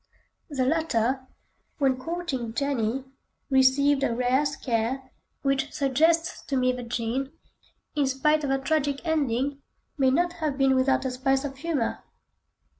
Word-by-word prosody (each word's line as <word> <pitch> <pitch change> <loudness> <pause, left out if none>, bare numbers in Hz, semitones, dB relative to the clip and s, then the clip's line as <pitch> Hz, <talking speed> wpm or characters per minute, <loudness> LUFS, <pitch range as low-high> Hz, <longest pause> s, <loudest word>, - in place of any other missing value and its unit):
The 265 -4 0
latter, 260 -4 0 0.5
when 270 -3 +2
courting 270 -7 -4
Jenny, 265 -2 -1 0.5
received 270 +2 +4
a 235 -4 +1
rare 255 +4 +2
scare, 260 -1 -2 0.3
which 275 +1 0
suggests 320 +5 +2
to 275 - 0
me 255 0 +3
that 250 -2 -6
Jean, 245 +4 -2 0.6
in 290 -2 +2
spite 300 +3 +2
of 285 - -1
her 270 - +2
tragic 285 +1 -1
ending, 280 -3 0 0.4
may 265 -1 +5
not 345 +6 +2
have 295 -3 -1
been 270 -1 +4
without 265 +1 +2
a 260 - 0
spice 270 +2 +1
of 275 -1 -5
humour. 300 -6 -2
270 Hz, 140 wpm, -26 LUFS, 255-290 Hz, 0.6 s, may